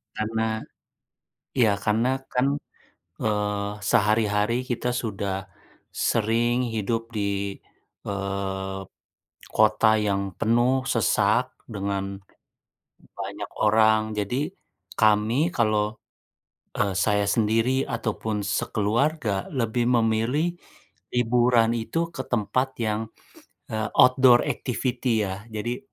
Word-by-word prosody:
Karena 110 +1 -1 1.1
iya, 115 -3 +5 0.2
karena 110 +3 +2 0.3
kan, 125 +1 +2 0.8
eee, 105 -1 0 0.2
sehari-hari 105 0 +2
kita 125 0 -1
sudah 100 -4 -3 0.6
sering 115 +2 +1 0.2
hidup 115 +2 -1 0.2
di, 100 -1 -1 0.5
eee, 95 -1 -3 0.7
kota 110 +1 +4 0.2
yang 100 0 +1 0.2
penuh 120 +3 +3 0.2
sesak 115 -5 +2 0.2
dengan 100 -2 -3 1.0
banyak - - -5
orang. 110 0 +5 0.2
Jadi, 125 - -1 0.5
kami 110 +10 +3
kalau, 110 -2 +2 0.9
e - - +1 0.2
saya 105 -1 +2
sendiri, 115 +4 +2
ataupun 110 -2 -2 0.2
sekeluarga 110 0 0
lebih 120 -1 0
memilih, 115 +8 +2 0.7
liburan 120 -1 +3
itu 115 +8 -3 0.2
ke 130 - -3
tempat 120 +4 +1 0.2
yang, 105 0 0 0.7
e - - -2 0.3
outdoor 125 -1 +6
activity, 125 -3 -1
ya. 95 +2 -6
Jadi, 120 +3 -3
110 Hz, 90 wpm, -25 LUFS, 105-120 Hz, 1.1 s, outdoor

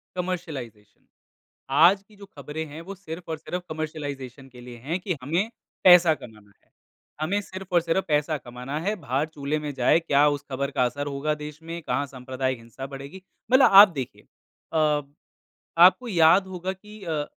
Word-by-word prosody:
Commercialisation. 140 - -6 0.7
आज 170 +8 +5
की 215 - -20
जो 200 0 -12
ख़बरें 150 -2 -7
हैं 150 +2 -9
वो 195 - -6
सिर्फ़ 175 -2 -9
और 160 - -2
सिर्फ़ 180 +3 -5
कमर्शियलाइज़ेशन 145 -4 -6
के 125 -1 -14
लिए 120 0 -10
हैं 170 +4 -1
कि 180 -2 -3
हमें, 170 - -1 0.3
पैसा 175 -3 +8
करना 110 -7 -13 0.2
है - - -39 0.5
हमें 185 +7 0
सिर्फ़ 190 -2 -9
और 175 - +6
सिर्फ़ 170 +3 0
पैसा 150 +1 +1
कमाना 125 +3 -6
है, 200 +6 -1
भार 140 - -1
चूल्हे 145 +1 -2
में 150 -1 -5
जाए 130 +5 +4
क्या 145 -3 +3
उस 145 -1 -2
ख़बर 140 +1 -2
का 125 - +1
असर 145 +4 -2
होगा 145 +2 -1
देश 150 0 -8
में, 165 +1 -6
कहाँ 145 -1 -1
सांप्रदायिक 130 -1 -4
हिंसा 115 +4 -9
बढ़ेगी 140 +7 -9 0.3
मतलब 260 +1 +7
आप 210 - +6
देखिए 130 - -6 0.5
अ, 155 -2 +2 0.8
आपको 185 +8 +6
याद 180 -1 +4
होगा 185 0 -4
कि 210 +2 -14
अ, 155 -4 -2
155 Hz, 175 wpm, -25 LUFS, 140-180 Hz, 0.8 s, पैसा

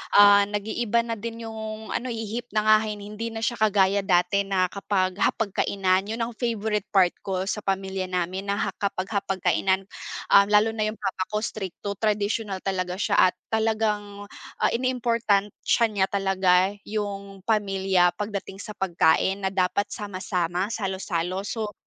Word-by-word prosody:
ah, 205 0 +8
nag-iiba 215 +3 0
na 230 -1 -3
din 230 +1 -6
yung 220 0 -7
ano, 255 - -2
ihip 225 +2 -5
ng 215 - +3
hangin. 215 -1 +3
Hindi 215 +3 -5
na 225 - -5
siya 240 +1 0
kagaya 200 -2 +3
dati 185 +1 +2
na 185 -2 +1
kapag 190 -2 -1
hapag-kainan, 195 -3 +1
yun 225 +2 -3
ang 230 -1 -6
favorite 220 -4 -1
part 185 -3 +5
ko 190 -2 -1
sa 210 - -1
pamilya 190 -1 -1
namin 185 +1 -2
na 200 - +1
ha - - 0
kapag 190 -1 -2
hapag-kainan. 195 -1 0 0.5
Um, 200 0 +8
lalo 210 +1 +4
na 215 -1 0
yung 215 - -5
papa 195 -2 -1
ko, 210 - +1
strict 195 -5 -5
to 200 -1 -2
traditional 210 -1 0
talaga 185 -2 -2
siya 200 - +1
at - - -37
talagang, 210 -2 -1 0.3
ah, - - +4
iniimportansiya 235 -3 +1
niya 200 -2 +2
talaga 190 -2 +3 0.2
yung 200 -2 -4
pamilya 195 -4 +2
pagdating 200 -1 -5
sa 210 - -7
pagkain 190 +1 +2
na - - +2
dapat 190 +2 +1
sama-sama, 185 -4 -3 0.2
salo-salo. 190 -3 -2
So, 210 0 -4
200 Hz, 155 wpm, -25 LUFS, 190-215 Hz, 0.5 s, ah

